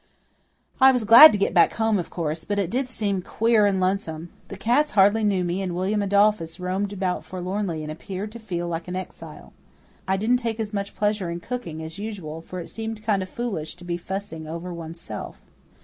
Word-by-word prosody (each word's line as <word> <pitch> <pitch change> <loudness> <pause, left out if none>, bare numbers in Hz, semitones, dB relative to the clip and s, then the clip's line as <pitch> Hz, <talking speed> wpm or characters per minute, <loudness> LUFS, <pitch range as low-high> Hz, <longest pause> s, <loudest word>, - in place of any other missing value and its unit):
I 265 0 +9
was 250 -3 +1
glad 235 +9 +11
to - - 0
get 200 - 0
back 175 - +4
home, 220 -2 +1
of 175 - -5
course; 160 -1 -3
but 205 - -2
it 195 -4 -1
did 255 +2 -1
seem 200 -6 -1
queer 220 +2 +2
and 195 -2 +1
lonesome. 185 -3 -1 0.2
The 195 - -8
cats 265 +9 +2
hardly 205 +2 +4
knew 195 -3 +2
me, 175 +2 -2
and 180 -3 -3
William 195 +4 0
Adolphus 200 -4 +2
roamed 190 +2 -2
about 185 -2 -2
forlornly 185 -2 -3
and 155 - -5
appeared 190 +6 -6
to 235 - -9
feel 175 -6 -4
like 165 0 -4
an 180 - -4
exile. 185 - -8 0.5
I 190 0 +1
didn't 225 +5 +2
take 230 -2 -3
as 215 -1 -3
much 200 -1 -4
pleasure 210 -3 0
in 170 0 -4
cooking 170 -7 -5
as 160 +4 -8
usual, 185 -7 -6
for 180 +2 -8
it 170 - -7
seemed 225 -1 -6
kind 210 -3 +1
of 185 - -5
foolish 195 -11 -4
to 175 - -15
be 175 -1 -2
fussing 175 -3 -5
over 170 +3 -6
oneself. 165 0 -7
195 Hz, 210 wpm, -24 LUFS, 175-215 Hz, 0.5 s, glad